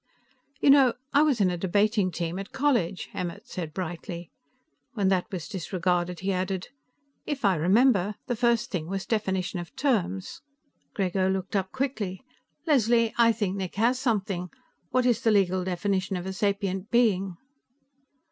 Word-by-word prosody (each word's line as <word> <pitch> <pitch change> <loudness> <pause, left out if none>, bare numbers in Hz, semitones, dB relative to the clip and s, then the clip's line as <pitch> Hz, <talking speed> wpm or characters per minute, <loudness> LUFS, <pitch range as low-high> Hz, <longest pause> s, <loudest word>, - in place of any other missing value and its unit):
"You 280 - +6
know, 270 -3 +6 0.2
I 285 - +6
was 295 -6 +3
on 185 -2 +3
a 175 - -3
debating 200 +2 +2
team 170 +1 -3
at 195 - -7
college," 245 -10 0
Emmert 175 -2 -5
said 165 -4 -5
brightly. 170 0 -6 0.6
When 200 -5 +1
that 185 -2 0
was 180 -4 -5
disregarded, 180 -1 -1
he 195 +1 0
added: 185 0 -2 0.6
"If 280 -6 -2
I 195 - +5
remember, 200 - +3
the 245 - -1
first 235 0 +1
thing 165 -5 -3
was 195 +1 -3
definition 190 -4 -1
of 175 -1 -9
terms." 195 - -1 0.5
Grego 190 -1 +1
looked 190 +1 -2
up 190 -1 0
quickly. 240 -8 -3 0.4
"Leslie, 235 -6 +3
I 230 -1 +6
think 205 -4 -2
Nick 185 -2 -4
has 235 +5 +2
something. 200 -8 -1 0.4
What 255 -1 +1
is 245 -2 +2
the 225 - +3
legal 185 -3 +2
definition 190 +1 -1
of 180 - -6
a 190 - -3
sapient 200 0 -1
being?" 195 -7 +2
195 Hz, 155 wpm, -27 LUFS, 180-230 Hz, 0.6 s, You